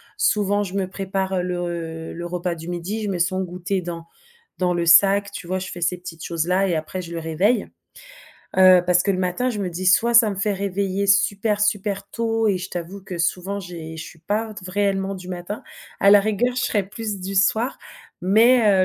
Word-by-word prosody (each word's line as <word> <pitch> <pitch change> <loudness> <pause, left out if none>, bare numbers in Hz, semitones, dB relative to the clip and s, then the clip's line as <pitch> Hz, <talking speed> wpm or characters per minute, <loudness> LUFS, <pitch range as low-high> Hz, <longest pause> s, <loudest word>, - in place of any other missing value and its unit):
Souvent, 205 0 +1
je 190 -1 -7
me 195 -2 0
prépare 190 -1 -2
le 170 -2 -4
le 170 +1 -6
repas 175 0 -3
du 165 +1 -8
midi. 185 +5 -4
Je 205 - -2
mets 185 - -2
son 185 +2 +1
goûter 180 +1 -3
dans 170 -1 -6 0.5
dans 180 -1 +1
le 170 -1 0
sac, 200 +4 +5
tu 180 - -8
vois. 185 +1 -2
Je 185 - -5
fais 175 - -7
ces 175 +1 0
petites 165 -2 -9
choses 170 0 -2
là 190 +2 +2
et 175 - 0
après 160 +4 -4
je 170 -1 -8
le 165 - -4
réveille. 170 +9 +1 0.9
Heu, 185 -1 +7
parce 180 0 +3
que 200 - +2
le - - -1
matin, 185 +7 0
je 210 -4 -3
me 185 -2 -2
dis: 185 +2 -4
«Soit 235 +6 +4
ça 230 -2 +7
me 200 - -2
fait 205 +1 0
réveiller 200 0 -1
super, 200 +2 +2
super 205 -1 0
tôt» 225 -1 0
et 190 -2 +1
je 185 +1 -6
t'avoue 175 +3 -6
que, 185 -2 -7
souvent 185 +4 -1
j'ai 165 -3 -8
je 165 - -6
suis 160 - -13
pas 215 +6 -2
te 190 - -10
v 185 - -7
réellement 195 -1 0
du 185 -1 -9
matin, 180 +3 -6 0.4
à 200 - +6
la 205 0 +8
rigueur 215 +4 0
je 255 - 0
serai 205 -4 +1
plus 205 0 -5
du 195 +2 -5
soir 225 +6 +2 0.5
mais, 215 -1 +5
190 Hz, 220 wpm, -22 LUFS, 175-205 Hz, 0.9 s, la